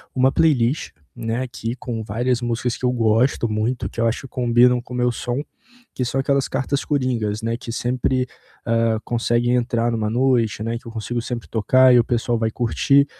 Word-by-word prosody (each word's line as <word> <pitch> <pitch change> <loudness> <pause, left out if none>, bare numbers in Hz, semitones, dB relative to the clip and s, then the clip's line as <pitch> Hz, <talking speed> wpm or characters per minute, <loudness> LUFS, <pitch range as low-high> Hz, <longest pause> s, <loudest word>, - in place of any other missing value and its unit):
uma 130 +1 +4
playlist, 140 -3 +2 0.2
né, 115 +1 -2
aqui 120 -2 -4
com 115 -3 -5
várias 120 +4 0
músicas 120 0 -2
que 130 - -3
eu 125 - +3
gosto 115 +1 +2
muito, 110 +4 -1
que - - -9
eu 115 - +3
acho 115 - -1
que 135 - -9
combinam 125 0 +3
com 125 - -11
o - - -3
meu 125 0 +2
som, 120 +3 -3 0.5
que 125 - -2
são 135 +3 0
aquelas 140 0 +1
cartas 135 +1 -2
coringas, 120 -7 -1
né, 115 +1 -2
que 120 - -10
sempre, 125 +1 0 0.4
hã, 115 -1 +1
conseguem 120 +1 +1
entrar 120 -1 0
em - - -1
uma 110 -1 -1
noite, 120 -3 +1
né, 115 +1 -2
que 125 - -16
eu - - -7
consigo 120 +2 -3
sempre 120 0 -5
tocar 130 +4 +4
e 125 - +7
o - - +4
pessoal 120 -1 0
vai 110 -1 0
curtir, 140 +4 +3
120 Hz, 205 wpm, -21 LUFS, 115-125 Hz, 0.5 s, e